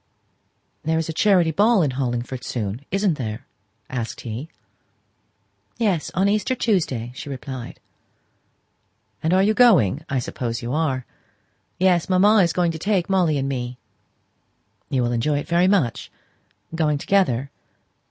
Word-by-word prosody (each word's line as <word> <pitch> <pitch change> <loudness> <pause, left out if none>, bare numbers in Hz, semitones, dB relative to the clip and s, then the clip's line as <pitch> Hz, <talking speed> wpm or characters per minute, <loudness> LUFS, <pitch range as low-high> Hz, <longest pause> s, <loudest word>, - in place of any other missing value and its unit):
"There 160 +1 0
is 160 0 -2
a - - -2
charity 180 -2 +3
ball 205 +3 +3
in 145 - 0
Hollingford 125 -1 -3
soon, 110 +1 -4
isn't 195 -5 0
there?" 115 +1 -5 0.4
asked 120 -3 -5
he. 120 +7 -6 1.3
"Yes; 200 -9 0
on 190 +2 +2
Easter 210 +4 +1
Tuesday," 155 - 0
she 140 +2 -8
replied. 130 -2 -7 1.4
"Are 185 +4 +3
you 215 +2 +3
going? 180 - +4
I 135 - 0
suppose 120 -1 -3
you 120 +2 -3
are?" 140 -5 -1 0.7
"Yes; 180 -2 +2
mamma 200 +4 +5
is 175 -5 +4
going 175 -1 +1
to 160 - -7
take 195 0 0
Molly 175 -6 +2
and 135 0 -1
me." 125 -2 -4 1.1
"You 130 -2 +1
will 120 - 0
enjoy 125 +5 0
it 145 - -4
very 175 +2 +3
much 185 - 0 0.6
going 155 -3 +1
together?" 140 -7 +1
155 Hz, 140 wpm, -22 LUFS, 125-185 Hz, 1.4 s, mamma